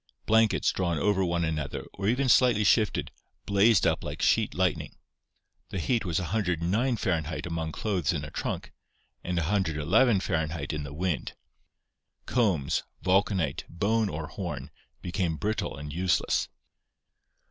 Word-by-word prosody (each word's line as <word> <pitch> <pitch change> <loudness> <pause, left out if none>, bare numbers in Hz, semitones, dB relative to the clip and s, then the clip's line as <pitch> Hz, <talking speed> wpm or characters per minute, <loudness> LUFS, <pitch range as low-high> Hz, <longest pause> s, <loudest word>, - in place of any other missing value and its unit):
Blankets 110 0 +3
drawn 85 -3 -1
over 95 +4 +2
one 85 -1 0
another 75 -3 -3
or 100 0 -3
even 130 +5 +2
slightly 120 -4 +5
shifted, 110 +1 +2 0.3
blazed 100 0 +4
up - - +1
like - - -5
sheet - - +2
lightning. - - -1 0.7
The - - -4
heat 115 +5 0
was 85 -3 -1
1090 95 - 0
Fahr. 90 -4 +1 0.2
among 80 -2 -3
clothes 90 -6 -1
in - - -3
a - - -9
trunk, - - -4 0.5
and 90 0 -2
ni° 95 - +2
Fahr. 80 -1 -1
in 75 -1 -3
the 70 0 -7
wind: 90 0 -2 0.9
combs, 95 - +1 0.2
vulcanite, 95 -6 +1
bone 105 +4 +1
or 80 -2 -4
horn, 75 - -6 0.3
became 90 -3 -1
brittle 105 -4 -2
and 75 +1 -7
useless. 90 +2 +1
90 Hz, 135 wpm, -28 LUFS, 80-105 Hz, 0.9 s, slightly